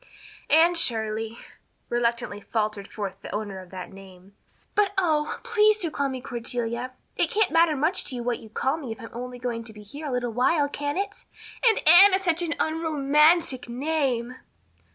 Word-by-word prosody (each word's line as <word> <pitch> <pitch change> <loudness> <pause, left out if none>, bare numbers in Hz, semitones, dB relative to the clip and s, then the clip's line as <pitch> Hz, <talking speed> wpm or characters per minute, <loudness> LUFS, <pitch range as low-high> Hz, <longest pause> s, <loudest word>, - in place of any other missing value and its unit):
"Anne 330 +3 +5
Shirley," 225 -7 0 0.5
reluctantly 235 -3 -1
faltered 210 -2 -2
forth 200 -3 -6
the - - -8
owner 205 -2 -4
of 185 -1 -12
that 185 -1 -8
name, 190 0 -15 0.4
"but, 410 -1 +2
oh, 310 -5 +1
please 430 -2 +3
do 345 -7 -2
call 280 -1 -1
me 260 -1 -5
Cordelia. 240 0 -4 0.2
It - - +2
can't 430 -4 +1
matter 330 -1 +4
much 310 +6 +1
to 255 - -1
you 240 - -4
what 245 0 -1
you 220 - -13
call 265 +7 -1
me 275 -8 -7
if 225 - -7
I'm 225 - -10
only 250 +1 -6
going 240 -2 -4
to 225 -1 -10
be 210 0 -12
here 290 +9 -8
a - - -3
little 245 -2 -2
while, 285 +5 +2
can 290 +1 -4
it? 400 +1 -4 0.4
And 440 - 0
Anne 375 +4 +9
is 385 - -2
such 340 -2 +1
an 335 -1 -2
unromantic 305 -3 +2
name." 255 -2 -1
255 Hz, 185 wpm, -25 LUFS, 230-320 Hz, 0.5 s, Anne